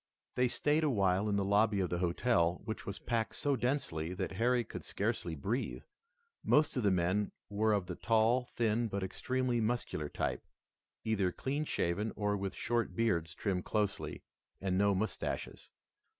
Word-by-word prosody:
They 125 Hz, 0 st, +3 dB
stayed 150 Hz, +5 st, +2 dB
a 155 Hz, -, +3 dB
while 100 Hz, -3 st, +2 dB
in 100 Hz, -, +1 dB
the 100 Hz, -1 st, +1 dB
lobby 100 Hz, +1 st, +3 dB
of 90 Hz, -2 st, 0 dB
the 85 Hz, -, 0 dB
hotel, 85 Hz, -1 st, +2 dB
which 110 Hz, -2 st, -5 dB
was 100 Hz, -, -4 dB
packed 115 Hz, -2 st, -1 dB
so 145 Hz, -1 st, +1 dB
densely 105 Hz, -, -1 dB
that -, -, -2 dB
Harry 120 Hz, +5 st, +2 dB
could -, -, -8 dB
scarcely 85 Hz, -2 st, -2 dB
breathe. 105 Hz, -, -2 dB, 0.6 s
Most 150 Hz, +1 st, +3 dB
of 125 Hz, -, +1 dB
the 105 Hz, -, +3 dB
men 95 Hz, +3 st, +1 dB, 0.2 s
were 110 Hz, +2 st, +2 dB
of 100 Hz, -3 st, +1 dB
the 90 Hz, -, -4 dB
tall, 115 Hz, +5 st, +2 dB
thin 115 Hz, -1 st, 0 dB
but 100 Hz, -2 st, -3 dB
extremely 125 Hz, +5 st, 0 dB
muscular 110 Hz, -10 st, -1 dB
type, -, -, -2 dB, 0.6 s
either 100 Hz, -5 st, +1 dB
clean 140 Hz, -, -2 dB
shaven 100 Hz, -, -1 dB
or 105 Hz, -1 st, 0 dB
with 100 Hz, -1 st, -3 dB
short 120 Hz, -1 st, -1 dB
beards 85 Hz, -8 st, +1 dB
trimmed 95 Hz, -3 st, -1 dB
closely, 105 Hz, -3 st, -1 dB, 0.4 s
and 95 Hz, -1 st, 0 dB
no 100 Hz, +1 st, +3 dB
mustaches. 110 Hz, +4 st, -3 dB
105 Hz, 165 wpm, -33 LUFS, 95-120 Hz, 0.6 s, They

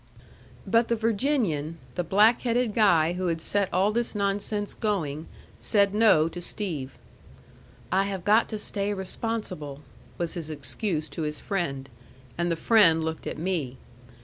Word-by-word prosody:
But 230 Hz, 0 st, +3 dB
the 235 Hz, -, +1 dB
Virginian, 215 Hz, -, 0 dB, 0.2 s
the 180 Hz, -, -2 dB
black 210 Hz, +7 st, +4 dB
headed 240 Hz, -2 st, 0 dB
guy 175 Hz, -7 st, +4 dB
who 180 Hz, 0 st, -2 dB
had 165 Hz, -1 st, 0 dB
set 200 Hz, +4 st, 0 dB
all 190 Hz, +4 st, +2 dB
this 235 Hz, 0 st, -1 dB
nonsense 205 Hz, +1 st, -1 dB
going, 165 Hz, -9 st, -2 dB, 0.3 s
said 200 Hz, -2 st, +2 dB
No 210 Hz, -8 st, +5 dB
to 175 Hz, +1 st, -7 dB
Steve. 165 Hz, -9 st, -5 dB, 0.9 s
"I 195 Hz, +1 st, +3 dB
have 195 Hz, -3 st, -4 dB
got 215 Hz, +4 st, +4 dB
to 215 Hz, -, -3 dB
stay 205 Hz, -1 st, -2 dB
responsible," 190 Hz, -7 st, -4 dB, 0.4 s
was 170 Hz, -1 st, -2 dB
his 165 Hz, -3 st, -5 dB
excuse 155 Hz, +3 st, -3 dB
to -, -, -6 dB
his 150 Hz, -1 st, -3 dB
friend. 140 Hz, -9 st, -3 dB, 0.5 s
And 175 Hz, 0 st, -1 dB
the -, -, +1 dB
friend 165 Hz, -4 st, +4 dB
looked 160 Hz, 0 st, -4 dB
at -, -, -4 dB
me. 160 Hz, -7 st, -2 dB
190 Hz, 150 wpm, -26 LUFS, 160-215 Hz, 0.9 s, No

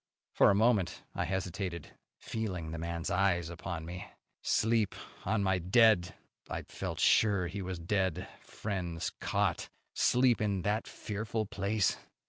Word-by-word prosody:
For -, -, +6 dB
a 100 Hz, -, +4 dB
moment 110 Hz, -3 st, +2 dB
I -, -, -1 dB
hesitated, 90 Hz, -2 st, -3 dB, 0.3 s
feeling 90 Hz, -8 st, -4 dB
the 85 Hz, -, -4 dB
man's 85 Hz, 0 st, -3 dB
eyes 90 Hz, -3 st, +2 dB
upon 85 Hz, -1 st, -5 dB
me. 90 Hz, +2 st, -7 dB, 0.3 s
Sleep 110 Hz, -3 st, +2 dB, 0.3 s
on 110 Hz, -2 st, +1 dB
my 95 Hz, -1 st, +2 dB
dead 95 Hz, 0 st, +4 dB, 0.3 s
I -, -, -3 dB
felt -, -, -5 dB
sure 100 Hz, -5 st, +4 dB
he 100 Hz, +3 st, -4 dB
was 95 Hz, -1 st, -4 dB
dead 95 Hz, +1 st, -1 dB
friend's 90 Hz, -6 st, -4 dB
cot! -, -, 0 dB, 0.2 s
Sleep 125 Hz, -2 st, +3 dB
in 100 Hz, -4 st, 0 dB
that 105 Hz, +3 st, 0 dB
fearful 110 Hz, +1 st, -3 dB
place! 100 Hz, -2 st, 0 dB
95 Hz, 135 wpm, -32 LUFS, 85-105 Hz, 0.3 s, For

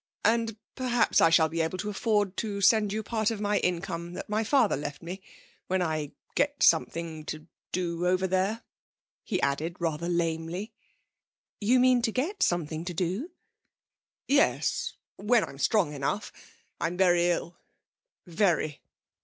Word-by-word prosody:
And 225 Hz, 0 st, +2 dB, 0.2 s
perhaps 245 Hz, -2 st, +2 dB
I 165 Hz, -, +6 dB
shall 165 Hz, -1 st, +5 dB
be 165 Hz, +1 st, -2 dB
able 160 Hz, +3 st, -1 dB
to 210 Hz, +3 st, -3 dB
afford 205 Hz, -2 st, 0 dB
to 205 Hz, -3 st, -2 dB
send 210 Hz, +1 st, +4 dB
you 215 Hz, +1 st, -2 dB
part 220 Hz, 0 st, 0 dB
of 225 Hz, -3 st, -3 dB
my 205 Hz, 0 st, +1 dB
income 175 Hz, -1 st, -2 dB
that -, -, -6 dB
my 215 Hz, +1 st, 0 dB
father 245 Hz, -1 st, +3 dB
left 145 Hz, +1 st, -6 dB
me 180 Hz, +3 st, -6 dB, 0.5 s
when 190 Hz, +1 st, +1 dB
I 155 Hz, -3 st, -2 dB, 0.2 s
get 285 Hz, 0 st, +1 dB
something 165 Hz, -1 st, +2 dB
to 155 Hz, 0 st, -6 dB, 0.3 s
do 175 Hz, -1 st, -1 dB
over 185 Hz, +1 st, +2 dB
there,' 190 Hz, +4 st, 0 dB, 0.6 s
he 190 Hz, -5 st, -2 dB
added 155 Hz, +5 st, 0 dB
rather 170 Hz, 0 st, -2 dB
lamely. 170 Hz, +3 st, -2 dB, 0.9 s
'You 240 Hz, +5 st, +3 dB
mean 250 Hz, -1 st, +4 dB
to 230 Hz, -1 st, 0 dB
get 290 Hz, -, -2 dB
something 160 Hz, -2 st, 0 dB
to 175 Hz, -1 st, -5 dB
do?' 185 Hz, -, -2 dB, 1.0 s
'Yes; 285 Hz, +1 st, +2 dB, 0.2 s
when 220 Hz, +2 st, +3 dB
I'm 135 Hz, -, -8 dB
strong 150 Hz, +2 st, +2 dB
enough. 145 Hz, +9 st, -2 dB, 0.5 s
I'm 170 Hz, +2 st, -2 dB
very 175 Hz, -2 st, +4 dB
ill 175 Hz, 0 st, -2 dB, 0.7 s
very.' 170 Hz, -4 st, 0 dB
185 Hz, 150 wpm, -28 LUFS, 165-215 Hz, 1.0 s, I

